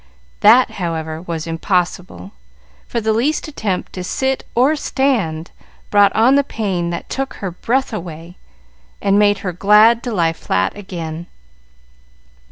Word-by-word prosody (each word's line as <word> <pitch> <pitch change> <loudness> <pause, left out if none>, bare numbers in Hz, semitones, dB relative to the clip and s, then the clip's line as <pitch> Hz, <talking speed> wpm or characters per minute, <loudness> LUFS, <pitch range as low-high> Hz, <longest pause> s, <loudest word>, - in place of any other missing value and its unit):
That, 235 +5 +6
however, 160 -2 -3
was 165 -2 -5
impossible, 170 - -2 0.6
for 235 - -2
the 220 -1 0
least 275 +10 0
attempt 215 -11 -3
to 185 - -5
sit 265 +8 -1
or 265 +6 +3
stand 225 - -1 0.4
brought 205 -1 +5
on 230 +4 +5
the 280 0 +4
pain 195 -9 -2
that 170 - -5
took 270 0 -4
her 195 -3 -5
breath 250 +8 -1
away 170 -2 -7 0.6
and 200 +1 +2
made 205 -1 +4
her 180 - -2
glad 210 +5 +5
to 245 - -4
lie 170 -6 +1
flat 95 - -1
again. 170 -4 -7
195 Hz, 140 wpm, -18 LUFS, 170-235 Hz, 0.6 s, That